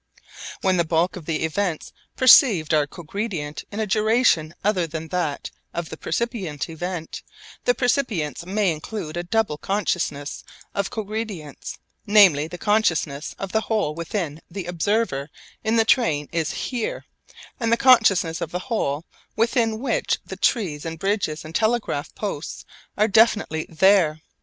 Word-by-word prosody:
When 190 Hz, -2 st, +2 dB
the 170 Hz, -, +3 dB
bulk 165 Hz, +2 st, +1 dB
of 170 Hz, -5 st, -9 dB
the 160 Hz, -2 st, -1 dB
events 165 Hz, 0 st, -2 dB, 0.2 s
perceived 225 Hz, -, +6 dB
are 150 Hz, -2 st, +3 dB
cogredient 170 Hz, -2 st, -5 dB
in 205 Hz, -, -5 dB
a 220 Hz, -, +1 dB
duration 215 Hz, -6 st, +2 dB
other 190 Hz, -4 st, +1 dB
than 160 Hz, 0 st, -6 dB
that 170 Hz, -6 st, -2 dB, 0.2 s
of 170 Hz, -1 st, -3 dB
the -, -, -6 dB
percipient 185 Hz, -, -3 dB
event, 170 Hz, 0 st, -5 dB, 0.4 s
the 245 Hz, -, +3 dB
percipience 220 Hz, -, 0 dB
may 195 Hz, +1 st, +1 dB
include 160 Hz, +1 st, -5 dB
a 175 Hz, -, -1 dB
double 175 Hz, -3 st, 0 dB
consciousness 175 Hz, -7 st, -2 dB, 0.3 s
of 200 Hz, -1 st, -1 dB
cogredience, 210 Hz, -, -5 dB, 0.3 s
namely 190 Hz, -8 st, +6 dB
the 175 Hz, -, -8 dB
consciousness 175 Hz, -9 st, 0 dB
of 195 Hz, -1 st, -5 dB
the 220 Hz, -, +2 dB
whole 215 Hz, -9 st, 0 dB
within 165 Hz, -1 st, -3 dB
which -, -, -18 dB
the 185 Hz, 0 st, -6 dB
observer 175 Hz, -4 st, -1 dB, 0.3 s
in 220 Hz, +1 st, +1 dB
the 225 Hz, -1 st, +4 dB
train 160 Hz, -, +2 dB
is 165 Hz, -3 st, -1 dB
'here,' 240 Hz, -4 st, -3 dB, 0.5 s
and 230 Hz, -2 st, 0 dB
the 235 Hz, -, +4 dB
consciousness 215 Hz, -10 st, +4 dB
of -, -, -2 dB
the 180 Hz, +9 st, -6 dB
whole 145 Hz, -6 st, -1 dB, 0.3 s
within 225 Hz, -1 st, +1 dB
which 275 Hz, -, 0 dB
the -, -, -7 dB
trees 170 Hz, -, 0 dB
and 165 Hz, 0 st, -5 dB
bridges 195 Hz, -5 st, -1 dB
and 155 Hz, -, -9 dB
telegraph 220 Hz, -8 st, 0 dB
posts 195 Hz, -8 st, -5 dB, 0.3 s
are 215 Hz, +1 st, +4 dB
definitely 215 Hz, -7 st, +3 dB
'there.' 165 Hz, -2 st, +4 dB
180 Hz, 150 wpm, -23 LUFS, 160-220 Hz, 0.5 s, perceived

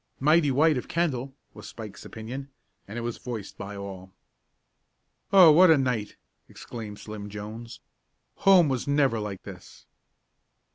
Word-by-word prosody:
"Mighty 150 Hz, +2 st, +4 dB
white 145 Hz, +1 st, +3 dB
of -, -, -10 dB
Kendall," 135 Hz, -6 st, -2 dB, 0.2 s
was -, -, -11 dB
Spike's 110 Hz, -3 st, -10 dB
opinion, 125 Hz, +5 st, -7 dB, 0.4 s
and 105 Hz, +3 st, -7 dB
it -, -, -3 dB
was 120 Hz, 0 st, -4 dB
voiced 115 Hz, -6 st, -7 dB
by 100 Hz, +1 st, -7 dB
all. 95 Hz, -2 st, -8 dB, 1.2 s
"Oh, 185 Hz, -5 st, +9 dB
what 180 Hz, +4 st, +7 dB
a 160 Hz, -, +6 dB
night!" 125 Hz, -6 st, -1 dB, 0.3 s
exclaimed 110 Hz, -3 st, -9 dB
Slim 105 Hz, -1 st, -8 dB
Jones. 110 Hz, +3 st, -8 dB, 0.6 s
"Home 190 Hz, -4 st, +6 dB
was 130 Hz, -2 st, -2 dB
never 140 Hz, -5 st, +2 dB
like 105 Hz, -3 st, -6 dB
this!" -, -, -12 dB
120 Hz, 140 wpm, -26 LUFS, 105-145 Hz, 1.2 s, Oh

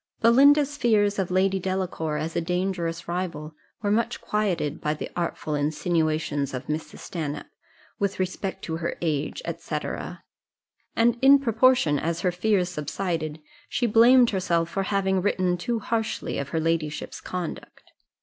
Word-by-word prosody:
Belinda's 285 Hz, +5 st, +5 dB
fears 205 Hz, -5 st, +2 dB
of 190 Hz, -, 0 dB
Lady 190 Hz, +1 st, +2 dB
Delacour, 185 Hz, -5 st, -2 dB
as 160 Hz, +2 st, -4 dB
a -, -, +1 dB
dangerous 175 Hz, -1 st, -2 dB
rival, 170 Hz, -3 st, -4 dB, 0.3 s
were 205 Hz, -, +1 dB
much 230 Hz, +3 st, 0 dB
quieted 185 Hz, -8 st, -1 dB
by 150 Hz, 0 st, 0 dB
the -, -, -6 dB
artful 170 Hz, -3 st, -2 dB
insinuations 150 Hz, -2 st, 0 dB
of 125 Hz, -, -5 dB
Mrs. 155 Hz, +1 st, -4 dB
Stanhope, 150 Hz, -4 st, -5 dB, 0.5 s
with 200 Hz, -1 st, -1 dB
respect 190 Hz, +1 st, -3 dB
to 160 Hz, -1 st, -3 dB
her 170 Hz, 0 st, -3 dB
age, 155 Hz, -, -1 dB, 0.2 s
&c. -, -, -3 dB, 1.2 s
and 235 Hz, +1 st, +3 dB
in 275 Hz, +1 st, +8 dB
proportion 230 Hz, -, +3 dB
as 170 Hz, +2 st, -2 dB
her 180 Hz, -, +2 dB
fears 185 Hz, 0 st, +1 dB
subsided, 160 Hz, -1 st, -3 dB, 0.3 s
she 245 Hz, -, 0 dB
blamed 235 Hz, +2 st, +6 dB
herself 170 Hz, -4 st, 0 dB
for 195 Hz, -, -1 dB
having 190 Hz, -2 st, +1 dB
written 185 Hz, -2 st, +1 dB
too 230 Hz, +7 st, -2 dB
harshly 225 Hz, 0 st, -2 dB
of 140 Hz, -1 st, -4 dB
her 160 Hz, -, -1 dB
ladyship's 160 Hz, -2 st, -2 dB
conduct. 180 Hz, -3 st, -6 dB
180 Hz, 145 wpm, -25 LUFS, 160-210 Hz, 1.2 s, in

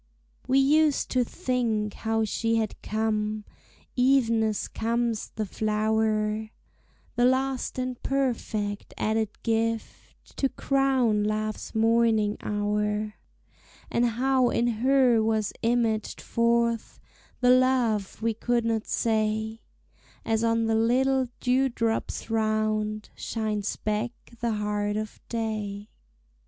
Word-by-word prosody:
We 265 Hz, -, +3 dB
used 295 Hz, +2 st, +3 dB
to 255 Hz, -1 st, +3 dB
think 225 Hz, -4 st, -1 dB
how 225 Hz, 0 st, -1 dB
she 225 Hz, +2 st, 0 dB
had 220 Hz, -2 st, -2 dB
come, 215 Hz, -1 st, -1 dB, 0.5 s
Even 250 Hz, -3 st, +3 dB
as 215 Hz, -2 st, -1 dB
comes 230 Hz, 0 st, -1 dB
the 215 Hz, -, -1 dB
flower, 215 Hz, +1 st, 0 dB, 0.7 s
The 240 Hz, -, +3 dB
last 260 Hz, 0 st, 0 dB
and 255 Hz, -1 st, -3 dB
perfect 225 Hz, -6 st, -2 dB
added 220 Hz, 0 st, 0 dB
gift 225 Hz, 0 st, -3 dB
To 270 Hz, -, +1 dB
crown 260 Hz, -6 st, +1 dB
Love's 215 Hz, +1 st, -3 dB
morning 225 Hz, -2 st, +3 dB
hour; 210 Hz, 0 st, -1 dB, 0.8 s
And 235 Hz, -, +2 dB
how 255 Hz, +2 st, +2 dB
in 235 Hz, -, +1 dB, 0.2 s
her 255 Hz, -3 st, +4 dB
was 220 Hz, -1 st, 0 dB
imaged 230 Hz, -2 st, 0 dB
forth 235 Hz, -1 st, 0 dB, 0.4 s
The 250 Hz, 0 st, +5 dB
love 245 Hz, -6 st, +2 dB
we 230 Hz, 0 st, +2 dB
could 235 Hz, +1 st, 0 dB
not 225 Hz, -1 st, -1 dB
say, 220 Hz, 0 st, 0 dB, 0.6 s
As 225 Hz, 0 st, +1 dB
on 230 Hz, 0 st, +2 dB
the 225 Hz, -, +1 dB
little 255 Hz, +4 st, +2 dB
dewdrops 250 Hz, -3 st, 0 dB
round 215 Hz, -1 st, 0 dB
Shines 215 Hz, -2 st, -2 dB
back 215 Hz, +3 st, -2 dB, 0.3 s
the 235 Hz, -1 st, 0 dB
heart 210 Hz, 0 st, -1 dB
of 215 Hz, 0 st, -5 dB
day. 215 Hz, -3 st, -3 dB
225 Hz, 110 wpm, -27 LUFS, 215-245 Hz, 0.8 s, The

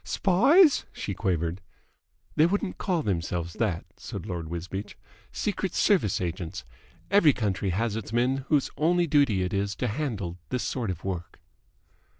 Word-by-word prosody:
"Spies?" 285 Hz, -, +4 dB
she 100 Hz, -, -4 dB
quavered. 90 Hz, -2 st, -1 dB, 0.7 s
"They 155 Hz, -, +5 dB
wouldn't 200 Hz, +1 st, -2 dB
call 175 Hz, -5 st, 0 dB
themselves 85 Hz, -3 st, -2 dB
that," 100 Hz, -7 st, 0 dB
said -, -, -7 dB
Lord 85 Hz, -5 st, -4 dB
Wisbeach. 95 Hz, +4 st, -5 dB, 0.3 s
"Secret 190 Hz, -3 st, -2 dB
Service 180 Hz, -, +3 dB
agents. 90 Hz, 0 st, -4 dB, 0.5 s
Every 195 Hz, -8 st, +6 dB
country 100 Hz, -4 st, -1 dB
has 105 Hz, +4 st, 0 dB
its 110 Hz, -2 st, -5 dB
men 125 Hz, +3 st, +2 dB
whose 145 Hz, -4 st, +2 dB
only 175 Hz, +4 st, +3 dB
duty 140 Hz, -, +3 dB
it 90 Hz, -, -3 dB
is 100 Hz, +1 st, -1 dB
to 125 Hz, -, -1 dB
handle 105 Hz, -, -3 dB
this 125 Hz, -1 st, -1 dB
sort 120 Hz, -5 st, -2 dB
of 90 Hz, -3 st, -4 dB
work." 90 Hz, -3 st, -5 dB
105 Hz, 150 wpm, -27 LUFS, 90-150 Hz, 0.7 s, Every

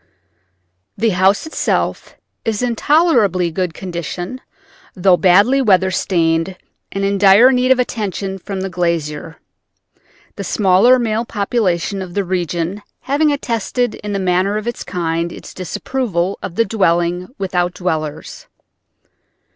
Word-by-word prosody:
The 225 Hz, +2 st, +2 dB
house 190 Hz, -, +2 dB
itself 315 Hz, -, -2 dB, 0.3 s
is 225 Hz, +1 st, -1 dB
in 240 Hz, -2 st, 0 dB
tolerably 225 Hz, -, +2 dB
good 175 Hz, -1 st, -2 dB
condition, 180 Hz, -, -5 dB, 0.5 s
though 185 Hz, 0 st, +4 dB
badly 200 Hz, +10 st, +4 dB
weather 190 Hz, -5 st, +3 dB
stained 170 Hz, 0 st, 0 dB, 0.3 s
and 195 Hz, 0 st, -2 dB
in 200 Hz, 0 st, 0 dB
dire 205 Hz, +6 st, +7 dB
need 250 Hz, 0 st, +1 dB
of 260 Hz, -, +5 dB
attention 200 Hz, -5 st, -3 dB
from 195 Hz, +1 st, -5 dB
the 195 Hz, -, -3 dB
glazier, 165 Hz, -3 st, -2 dB, 1.0 s
the 200 Hz, -, -4 dB
smaller 200 Hz, +6 st, +4 dB
male 225 Hz, -2 st, -1 dB
population 200 Hz, -4 st, -1 dB
of 180 Hz, -2 st, -8 dB
the 200 Hz, -, +1 dB
region 175 Hz, +1 st, -2 dB, 0.2 s
having 290 Hz, +3 st, +1 dB
attested 245 Hz, -3 st, -1 dB
in 210 Hz, -, -7 dB
the 200 Hz, -, -1 dB
manner 190 Hz, +2 st, +1 dB
of 215 Hz, -, -4 dB
its 240 Hz, -, -4 dB
kind 170 Hz, -2 st, -2 dB
its -, -, -10 dB
disapproval 190 Hz, 0 st, -2 dB
of 175 Hz, -, -6 dB
dwelling 180 Hz, -5 st, +1 dB
without 180 Hz, -2 st, -1 dB
dwellers. 160 Hz, -, -4 dB
190 Hz, 130 wpm, -17 LUFS, 175-225 Hz, 1.0 s, dire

